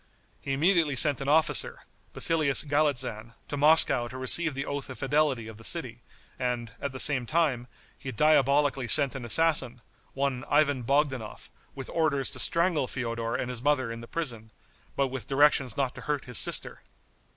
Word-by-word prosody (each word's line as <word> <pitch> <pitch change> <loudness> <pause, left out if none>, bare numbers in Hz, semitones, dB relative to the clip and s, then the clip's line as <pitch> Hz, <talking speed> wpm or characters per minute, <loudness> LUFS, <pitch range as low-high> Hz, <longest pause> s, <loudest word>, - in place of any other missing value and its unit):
He 135 - -5
immediately 160 0 +2
sent 140 +1 +2
an 135 - -3
officer, 155 +1 +2 0.3
Basilius 155 -4 +1
Galitzan, 130 -7 -2
to - - -5
Moscow 145 -4 +5
to 130 - -9
receive 145 +4 +3
the 135 - -4
oath 140 -1 -4
of 130 - -8
fidelity 135 -4 0
of 110 -1 -11
the 115 - -14
city, - - 0 0.4
and, 120 -2 -3
at 140 - -3
the 130 - -8
same 130 -5 +3
time, 145 -7 0 0.3
he 130 - -6
diabolically 140 -3 +2
sent 140 +1 +2
an 135 -3 -7
assassin, 130 -2 +1 0.4
one 135 -2 -2
Ivan 145 -3 +2
Bogdanoff, 130 -3 -2 0.2
with 135 -2 -8
orders 150 -5 0
to - - -6
strangle 170 -5 +1
Feodor 115 -2 -4
and 125 0 -3
his 120 -2 -6
mother 130 -4 0
in 115 0 -8
the 115 - -11
prison, 115 -9 -5 0.5
but 140 -1 0
with 130 -1 -6
directions 135 -4 +2
not 135 -3 -1
to - - -11
hurt 145 -2 -3
his 125 -5 -2
sister. - - -1
135 Hz, 175 wpm, -27 LUFS, 125-150 Hz, 0.5 s, Moscow